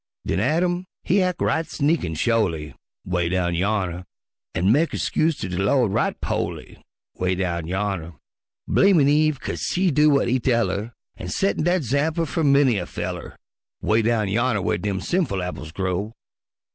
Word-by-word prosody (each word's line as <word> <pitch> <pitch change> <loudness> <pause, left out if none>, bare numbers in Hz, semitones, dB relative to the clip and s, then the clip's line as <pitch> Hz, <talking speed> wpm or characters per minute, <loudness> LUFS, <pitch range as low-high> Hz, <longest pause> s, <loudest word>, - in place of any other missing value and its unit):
Den - - 0
Adam 175 - 0 0.2
he 195 +2 +2
ac' 180 -1 0
right 160 0 +1
sneakin' 145 - 0
sho'ly, 85 -6 0 0.3
('Way 90 -2 0
down 90 -1 0
yonner) 90 -1 -1 0.5
An' 90 +5 +3
mek 155 +7 +2
his - - -2
'scuse 160 -2 +1
ter - - -3
de 90 0 -3
Lawd 105 +1 +2
right - - 0
po'ly, - - -4 0.4
('Way 90 0 +1
down 85 -3 -2
yonner) 95 -3 -2 0.5
Blamin' 185 -8 +4
Eve 150 0 +3
'kase - - -5
she 180 -1 +2
do 150 +2 +4
w'at 140 -4 +3
he 130 +2 +2
tell 120 -1 +1
'er, 110 +4 -5 0.2
An' 90 - -7
settin' 195 - 0
dat 175 -1 +2
'zample 150 +7 0
fer 165 - -2
many 140 -6 +4
a 85 - -5
feller, - - -6 0.4
'Way 110 +2 +2
down 110 -2 +1
yonner 110 0 +1
whar - - 0
dem 100 -2 -2
sinful 155 - 0
apples 85 -3 -6
grow. 95 +4 -2
115 Hz, 170 wpm, -23 LUFS, 95-155 Hz, 0.5 s, Blamin